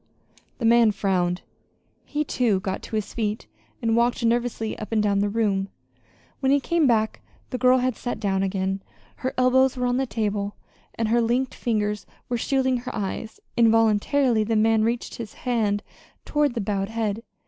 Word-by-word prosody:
The 235 - -2
man 230 -1 +6
frowned. 180 -3 0 0.6
He, 295 +1 -1
too, 235 -8 +1
got 190 0 -3
to - - -6
his 210 -1 -3
feet 215 -1 -2 0.4
and 225 -1 +2
walked 235 0 +2
nervously 235 -1 0
up 215 - -7
and 215 -1 +2
down 200 -1 +2
the 205 +1 +1
room. 200 -3 0 0.7
When 265 -1 +2
he 285 - +5
came 325 +2 +2
back 220 -3 +1 0.3
the 250 - -3
girl 255 +1 +5
had 255 -1 0
sat 245 - -4
down 195 -3 0
again. 190 0 -1 0.4
Her 260 - -3
elbows 260 +1 +4
were 250 - 0
on 245 0 +1
the 265 0 0
table, 205 -3 -2 0.4
and 225 -1 -1
her 235 +1 +3
linked 245 +3 0
fingers 210 -3 -1 0.2
were 245 - 0
shielding 260 0 +1
her 250 +1 -6
eyes. 205 +2 -4 0.2
Involuntarily 225 +2 +3
the 225 +1 0
man 220 0 +3
reached 235 +1 -1
his 230 -3 -7
hand 215 -4 +1 0.4
toward 295 -4 +1
the 230 - -1
bowed 195 0 -1
head. 225 -1 -2
225 Hz, 175 wpm, -24 LUFS, 205-245 Hz, 0.7 s, man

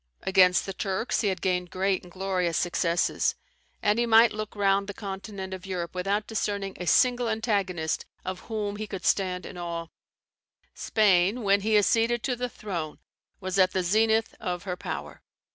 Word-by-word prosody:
Against 185 -1 +4
the 195 - -4
Turks 195 +4 -1
he 215 - +1
had 190 -3 -2
gained 180 -1 0
great 190 +1 0
and 180 - -15
glorious 185 -3 -1
successes; 170 -1 +1 0.5
and 210 +2 +3
he 240 - +2
might 225 0 +6
look 215 0 -5
round 200 -1 +2
the 200 - -6
continent 195 -1 -6
of 190 +1 -7
Europe 175 -3 -4
without 195 +3 -1
discerning 200 -3 -2
a 180 - -5
single 245 +2 +3
antagonist 200 -8 -1 0.2
of 185 0 -4
whom 210 -2 -2
he 215 0 -5
could 195 -2 -6
stand 185 -2 +1
in 180 - -8
awe. 170 -1 -4 0.8
Spain, 205 +2 +2
when 200 0 +3
he 215 +1 +3
acceded 230 +3 +2
to 255 - 0
the 250 +1 -3
throne, 170 -10 -5 0.4
was 185 0 -2
at 185 -1 +4
the 185 - 0
zenith 220 +4 +2
of 180 -1 -3
her 180 -3 -3
power. - - -6
195 Hz, 175 wpm, -27 LUFS, 180-215 Hz, 0.8 s, might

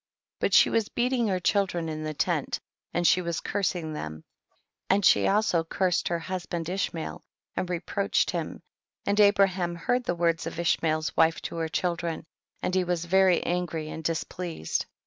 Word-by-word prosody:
28. - - +2
But - - -6
she - - +7
was 225 -2 +1
beating 245 -1 +1
her 185 -2 0
chil 200 +2 +2
dren 170 -2 -3
in 155 -1 -4
the 155 -1 -4
tent, - - 0 0.3
and 175 - 0
she 180 - +5
was 170 -2 -2
curs 195 -2 -1
ing 160 -3 -4
them, 80 - -6 0.7
and 195 0 +3
she - - +5
also 200 -5 +2
cursed 180 +2 0
her 170 - 0
husband 175 -1 -4
Ishmael 180 -3 -3 0.3
and 185 - -2
reproached 190 +3 0
him, 170 -2 -4 0.4
and 205 +1 +1
Abraham 195 -4 +4
heard 245 +9 0
the 175 - 0
words 170 -1 +1
of - - -5
fshmael's 160 -2 0
wife 160 0 +4
to - - -5
her 165 -1 -1
children, 170 -2 -2 0.4
and 180 - -1
he 185 0 +3
was 175 -1 -1
very 190 0 +4
angry 170 -3 -2
and 160 - -6
dis 165 0 0
pleased, 170 - -3
29. - - -43
175 Hz, 185 wpm, -27 LUFS, 165-190 Hz, 0.7 s, she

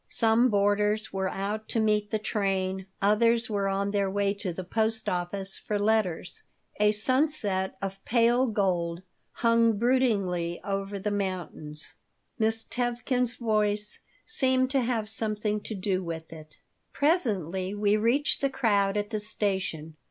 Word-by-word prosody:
Some 230 +2 +3
boarders 210 +1 +1
were 190 -1 -1
out 210 +3 -4
to 230 - 0
meet 210 -1 +1
the 215 - 0
train, 190 -3 -1 0.2
others 230 +2 +3
were 200 -1 0
on 195 +1 0
their 200 -1 +1
way 200 0 +1
to 200 -2 -4
the 185 +2 -5
post 220 +4 0
office 190 +2 -2
for 210 - -2
letters. 205 -4 0 0.4
A 210 0 +5
sunset 215 -4 0
of 195 0 -5
pale 240 +2 +3
gold 180 -5 0 0.3
hung 230 -2 +3
broodingly 200 -8 +1
over 195 0 -3
the 205 +2 -2
mountains. 180 -6 -4 0.5
Miss 225 0 +1
Tevkin's 245 +1 -1
voice 210 -2 0 0.3
seemed 260 -10 +1
to 275 -2 +2
have 230 -3 -1
something 210 -1 -1
to 220 - -6
do 190 -1 -1
with 165 -1 -6
it 155 -1 -13 0.4
Presently 200 - 0
we 205 0 +2
reached 235 +9 +2
the 275 - +2
crowd 210 -6 +1
at 205 +1 -2
the 215 - -1
station. 190 -7 -2
210 Hz, 145 wpm, -28 LUFS, 190-225 Hz, 0.5 s, A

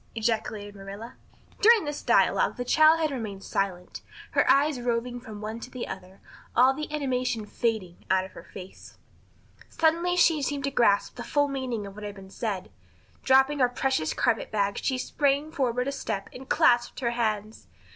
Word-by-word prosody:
ejaculated 220 -2 -2
Marilla. 200 +4 -9 0.5
During 445 -3 +6
this 295 0 -4
dialogue - - +2
the 245 - -3
child 315 +4 +5
had 310 -2 0
remained 215 -7 -5
silent, 185 -2 -3 0.3
her - - +2
eyes 285 -1 +4
roving 245 0 -2
from 220 -4 -10
one 220 +2 -5
to 250 - -9
the 255 -2 -6
other, 190 +1 -9 0.3
all 255 +2 +6
the 300 +2 -6
animation 255 -6 -1
fading 210 -6 -3
out 190 0 +2
of 190 - -12
her - - -11
face. 190 -1 -12 0.7
Suddenly 335 +2 +1
she 325 -4 +4
seemed 280 0 -2
to 275 - -1
grasp 205 -6 +2
the - - -5
full 290 -1 +1
meaning 255 -6 -3
of 195 - -9
what 210 +1 -10
had 205 -1 -6
been 190 -1 -12
said. 200 -5 -4 0.5
Dropping 270 +2 +4
her 250 -2 +4
precious 250 -9 -1
carpet 225 - +1
bag 200 -2 0
she 260 - 0
sprang 285 +3 0
forward 250 -4 -1
a - - 0
step 200 -7 -4
and 265 +1 -11
clasped 240 +1 +3
her 235 -2 0
hands. 215 -2 -2
245 Hz, 175 wpm, -27 LUFS, 205-275 Hz, 0.7 s, During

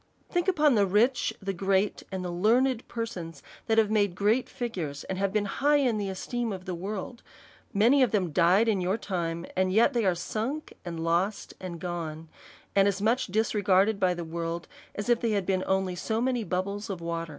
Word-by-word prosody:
Think 350 0 0
upon 305 -6 +4
the 205 -3 +3
rich, 230 +7 +2
the 195 0 -2
great, 195 +2 +1
and 190 -1 -4
the 175 - -3
learned 235 +7 +2
persons, 175 - -6 0.2
that 225 -1 +2
have 215 -1 +4
made 205 -4 +2
great 215 +6 +1
figures, 175 - -4
and 190 +1 -1
been 210 0 +1
high 285 +9 +2
in 250 -7 +2
the 200 -1 -2
esteem 235 +5 -3
of 185 -2 -6
the 185 - -3
world; 200 +6 -5 0.5
many 235 +8 +4
of 255 - +5
them 190 -5 0
died 180 +8 +4
in 205 -4 +2
your 185 +4 0
time, 170 -5 -3
and 185 0 +1
yet 230 +8 +4
they 235 -2 +1
are 185 -3 +2
sunk, 225 - -4
and 170 -2 -5
lost, 175 +5 0
and 175 -3 -6
gone, 165 -3 -5 0.5
and 195 0 +5
as 200 -1 0
much 230 +5 +1
disregarded 205 -1 +2
by 185 -2 +2
the 170 - -4
world, 165 +1 -4 0.3
as 205 - -4
if 240 -1 +3
they 230 -2 +1
had 200 -3 0
been 185 -1 0
only 190 -1 0
so 220 +5 -2
maoy 245 -2 -1
bubbles 200 +3 -2
of 190 -3 -4
water. 165 0 -4
200 Hz, 200 wpm, -28 LUFS, 180-225 Hz, 0.5 s, of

